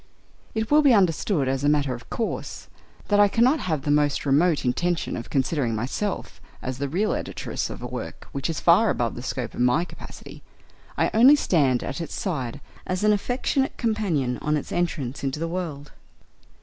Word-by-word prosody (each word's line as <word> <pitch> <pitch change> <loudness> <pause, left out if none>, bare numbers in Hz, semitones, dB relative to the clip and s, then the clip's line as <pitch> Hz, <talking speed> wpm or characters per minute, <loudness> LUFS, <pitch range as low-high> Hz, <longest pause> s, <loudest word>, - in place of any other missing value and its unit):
It 220 +2 -2
will 300 +1 +7
be 275 -5 +6
understood, 175 -5 +2
as 135 +1 -1
a 145 - +3
matter 145 -3 +2
of 120 -1 -10
course, 225 - -4 0.4
that 205 -1 +4
I 205 - +7
cannot 245 +9 +3
have 155 -6 -2
the 145 - 0
most 145 -1 +2
remote 150 +2 +3
intention 175 +7 0
of 115 - -6
considering 130 -4 0
myself 130 - -3 0.2
as 130 0 -5
the 140 -1 -2
real 200 +8 0
editress - - -4
of - - -8
a - - -4
work - - -7
which 140 +2 -3
is 165 - -2
far 190 +6 +5
above 120 -1 0
the 120 - -7
scope 125 -2 -4
of - - -8
my 125 +8 +3
capacity: - - -11 0.6
I - - +2
only 250 +6 +8
stand 140 - +2
at 140 - -4
its 165 - -5
side 140 - -3 0.3
as 185 +2 -2
an 210 0 +5
affectionate 255 +5 -1
companion 185 - 0
on 150 0 0
its 145 - -6
entrance 145 -7 -2
into 135 +2 -2
the 165 - -1
world. 165 -5 -5
155 Hz, 190 wpm, -24 LUFS, 135-205 Hz, 0.6 s, only